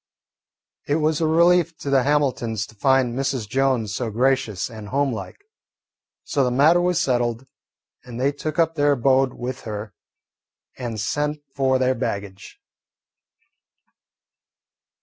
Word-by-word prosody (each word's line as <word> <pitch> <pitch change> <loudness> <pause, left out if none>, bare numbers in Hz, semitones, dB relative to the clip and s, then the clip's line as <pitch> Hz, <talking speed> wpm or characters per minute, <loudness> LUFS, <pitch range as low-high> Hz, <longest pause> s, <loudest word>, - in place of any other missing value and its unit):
It 145 - +1
was 155 0 +1
a 160 - +2
relief 170 0 +3
to 140 - -5
the 135 -1 +4
Hamiltons 125 -6 0
to 110 - -17
find 130 +2 +2
Mrs. 130 -3 -2
Jones 125 -3 0
so 120 +1 -2
gracious 120 -4 0
and 110 -3 -10
home 135 +3 0
like. 110 - -7 0.9
So 140 -3 0
the 125 - +1
matter 150 +8 +4
was 180 -1 +1
settled, 120 -4 0 0.6
and 125 -1 -8
they 135 +2 +2
took 155 +1 -5
up 165 -1 +2
their 145 -2 +3
abode 135 0 +2
with 125 +1 -5
her 105 -1 -6 0.8
and 120 -4 -5
sent 145 +7 -2
for 135 -1 +2
their 130 0 +2
baggage. 100 -6 -5
130 Hz, 135 wpm, -22 LUFS, 115-145 Hz, 0.9 s, the